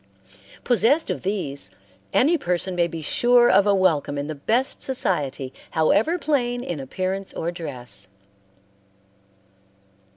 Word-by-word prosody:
Possessed 255 +6 +2
of - - -4
these, 185 -8 -3 0.4
any 305 +7 +4
person 180 - -1
may 170 -1 +2
be 165 -2 -7
sure 240 +8 +4
of 200 - +5
a 200 - +4
welcome 160 -7 +1
in 140 - -2
the 155 - -4
best 225 - -1
society, 150 - -1 0.2
however 205 - +2
plain 245 -7 0
in 175 - -4
appearance 185 +8 -4
or 170 - -3
dress. 145 -9 -7
185 Hz, 125 wpm, -23 LUFS, 155-245 Hz, 0.4 s, of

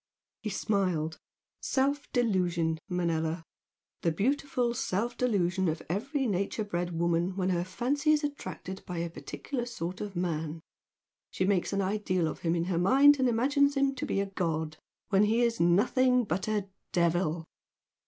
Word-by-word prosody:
He 215 - -3
smiled. 180 -6 0 0.4
"Self 280 +2 0
delusion, 180 -9 +1
Manella! 165 -2 -1 0.6
The 165 - +2
beautiful 250 - 0
self 235 +2 -1
delusion 190 -6 +1
of 160 +1 -3
every 265 - -1
nature 200 0 -1
bred 175 -4 -3
woman 170 +2 +1
when 190 -1 0
her 175 -1 +1
fancy 260 - 0
is 305 0 +3
attracted 190 -9 -5
by 180 - -4
a 170 0 -2
particular 240 - -5
sort 185 -6 -5
of 205 -2 -5
man. 165 -2 -2 0.7
She 185 - -1
makes 190 -2 +1
an 200 -1 0
ideal 185 -3 0
of - - -5
him 165 0 0
in 170 - +1
her 175 -1 0
mind 275 +9 +6
and 260 -1 +3
imagines 280 +4 +2
him 275 0 +3
to 260 - -4
be - - 0
a 200 - +1
god, 160 -5 -2 0.3
when 200 0 +4
he 225 +3 +2
is 235 -1 +1
nothing 245 +9 +4
but 195 -2 -2
a 210 -2 -1 0.2
devil!" 170 -1 +1
190 Hz, 160 wpm, -29 LUFS, 170-240 Hz, 0.7 s, mind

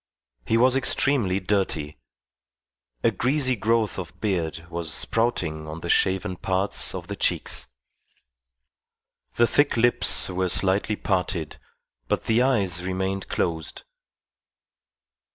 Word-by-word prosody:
He 115 - +3
was 125 +2 +4
extremely 125 -7 +2
dirty. 90 -7 -2 1.0
A - - +4
greasy 130 0 +1
growth 110 -1 0
of 85 -2 -8
beard 85 -6 -2
was 85 -2 -2
sprouting 80 -9 -1
on 80 +2 -7
the 85 - -6
shaven 95 -1 +1
parts 95 +1 -1
of 90 -2 -6
the 100 +2 -6
cheeks. - - -1 1.7
The 120 - +4
thick 145 +2 +2
lips 120 +1 +4
were 95 0 -1
slightly 100 +4 +1
parted, 90 -5 -2 0.5
but - - -1
the 115 +2 +2
eyes 100 -10 +1
remained 95 +1 -2
closed. 80 -2 -2
95 Hz, 115 wpm, -24 LUFS, 85-115 Hz, 1.7 s, was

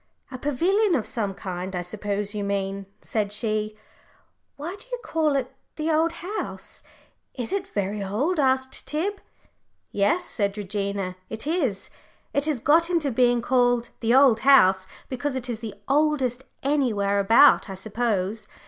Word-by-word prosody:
"A 255 - -6
pavilion 350 - +2
of 230 -7 -1
some 210 -3 -2
kind, 185 0 -5
I 180 - -2
suppose 205 +2 -3
you 210 -1 -3
mean," 195 -1 -2
said 210 -2 -2
she. 215 0 -2 0.8
"Why 325 +6 -6
do 405 - -14
you - - -1
call 315 -7 +1
it 260 -2 -2 0.2
the 315 +1 -1
old 320 +2 +2
house? 400 +5 -6 0.5
Is 245 +6 -3
it 390 -1 -1
very 205 - -2
old?" 270 - -1
asked 260 -1 +1
Tib. 370 +8 -2 0.7
"Yes," 335 - +1
said 200 - -2
Regina, 200 -2 -3
"it 220 +2 -4
is. 290 - -1 0.4
It 280 0 +1
has 305 -5 0
got 325 +7 +3
into 330 -6 +1
being 245 0 +3
called 245 -1 +2
the 235 +1 +2
old 265 -5 +6
house 190 -9 +5 0.2
because 265 +2 -3
it 260 -1 -3
is 235 -3 -4
the 220 -3 -7
oldest 270 -3 +1 0.2
anywhere 225 -9 +1
about, 225 +4 +6
I 195 - -5
suppose. 215 0 -2
240 Hz, 155 wpm, -25 LUFS, 205-290 Hz, 0.8 s, old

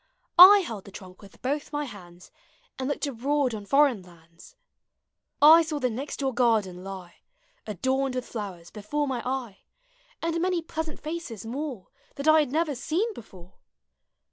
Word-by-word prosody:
I 395 +3 +11
held 225 - -7
the 200 - -12
trunk 185 -1 -12
with 200 -2 -17
both 285 +3 -2
mv 295 0 -2
hands 180 -7 -13 0.5
And 260 +1 -2
looked 285 - -2
abroad 275 0 -1
on 205 -2 -7
foreign 275 -5 +3
lauds. 170 - -18 0.8
I 315 +3 +8
saw 315 -2 -3
the 255 -3 -1
next 265 +6 -5
door 265 -1 -1
gardeu 225 -6 +2
lie. 185 0 -9 0.5
Adorned 260 +6 -1
with 255 - -3
flowers, 190 -7 -7
before 285 +8 -3
my 255 -3 -2
eye. 250 -6 -4 0.6
And 335 0 -2
many 360 -2 0
pleasant 320 -1 -5
faces 305 - -6
more 255 -3 -6 0.3
That 280 +2 -5
I 315 0 +7
had 295 -5 0
never 315 0 0
seen 340 - -2
before. 185 - -14
260 Hz, 160 wpm, -26 LUFS, 200-295 Hz, 0.8 s, I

